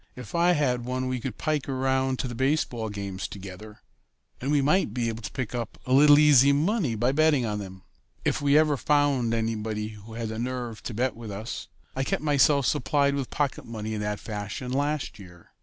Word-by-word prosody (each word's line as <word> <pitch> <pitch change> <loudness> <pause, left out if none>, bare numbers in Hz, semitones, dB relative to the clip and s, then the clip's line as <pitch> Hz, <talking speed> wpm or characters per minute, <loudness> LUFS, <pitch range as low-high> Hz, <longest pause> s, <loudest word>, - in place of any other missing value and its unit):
"If 125 -4 -10
I 175 +1 +4
had 130 -6 +1
one 130 +1 -2
we 130 0 -2
could 120 -2 -5
pike 150 -3 -1
around 130 0 0
to 130 - -2
the 120 - -5
baseball 125 -3 0
games 100 -2 -5
together, 100 +2 -10 0.6
and 135 - -2
we 145 0 +3
might 145 - +2
be 120 -2 0
able 115 0 -5
to - - -6
pick 130 -3 -4
up 120 -2 -4
a 130 - 0
little 145 +2 +8
easy 145 -2 +6
money 155 - +1
by 120 +4 +1
betting 150 -3 +3
on 105 -1 -2
them 95 -2 -9 0.4
if - - +1
we 145 +1 +4
ever 155 -2 +3
found 145 -5 +2
anybody 110 -1 -2
who 110 +1 -12
had 115 -1 -3
the 110 0 -5
nerve 120 -2 -4
to 115 - -6
bet 125 +3 0
with 115 -1 -8
us. 105 +4 -6 0.3
I 135 - 0
kept 135 - -2
myself 145 -1 +4
supplied 140 +2 +2
with 140 -2 -3
pocket 145 -3 -1
money 110 -1 -5
in 105 - -3
that 105 0 -2
fashion 105 +4 -5
last 140 -5 -1
year. 90 -3 -14
125 Hz, 205 wpm, -26 LUFS, 110-140 Hz, 0.6 s, little